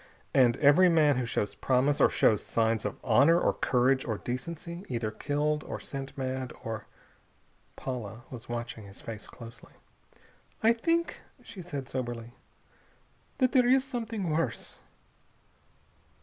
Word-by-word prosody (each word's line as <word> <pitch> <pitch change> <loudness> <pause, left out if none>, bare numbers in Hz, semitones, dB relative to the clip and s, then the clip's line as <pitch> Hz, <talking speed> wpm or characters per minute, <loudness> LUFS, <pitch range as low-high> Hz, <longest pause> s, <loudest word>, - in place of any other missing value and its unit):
And 125 -3 +5
every 155 +6 +6
man 150 -5 +4
who 125 -2 -1
shows 105 - -1
promise, 135 +3 +1
or - - +6
shows 105 -3 +3
signs 115 -2 0
of 105 - -3
honor 140 +8 +5
or - - +2
courage 130 +1 +2
or 110 -3 -2
decency, 170 - -5
either 115 -4 -2
killed 150 +5 -1
or - - -6
sent 135 0 -7
mad 130 -1 -3
or...." 110 -1 -5 0.9
Paula 120 -3 -6
was 120 -3 -9
watching 120 -2 -5
his 100 0 -12
face 110 -2 -8
closely. 115 -1 -12 0.9
"I 225 +1 +6
think," 330 +8 0 0.2
she 215 -5 -9
said 145 -7 -6
soberly, 120 -3 -5 1.0
"that 255 -2 +3
there 250 -3 +4
is 260 +1 +5
something 230 - -3
worse." 150 -7 -2
130 Hz, 135 wpm, -29 LUFS, 115-165 Hz, 1.0 s, every